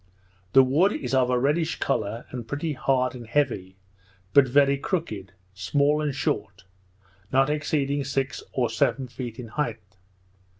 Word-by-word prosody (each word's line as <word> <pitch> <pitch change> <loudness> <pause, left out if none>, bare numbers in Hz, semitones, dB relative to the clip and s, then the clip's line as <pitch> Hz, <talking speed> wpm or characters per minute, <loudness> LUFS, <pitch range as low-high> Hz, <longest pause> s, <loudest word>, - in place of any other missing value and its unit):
The 135 - +8
wood 160 +11 +3
is 300 - -4
of 130 -1 +3
a 125 - +2
reddish 150 +6 +1
colour, 115 -3 -1
and 120 -3 -6
pretty 150 +4 -2
hard 130 -2 +1
and 120 -3 -9
heavy, 110 -9 -1 0.6
but 140 -2 +6
very 140 +2 +4
crooked, 135 - -3 0.2
small, 145 +10 +1
and 145 -3 -1
short, 100 -8 -2 0.7
not 135 +2 +3
exceeding 145 -1 0
six 135 0 -2
or 125 -2 +1
seven 130 +3 +1
feet 120 -1 -7
in 120 -3 -8
height. 110 -8 -4
135 Hz, 145 wpm, -25 LUFS, 115-145 Hz, 0.7 s, The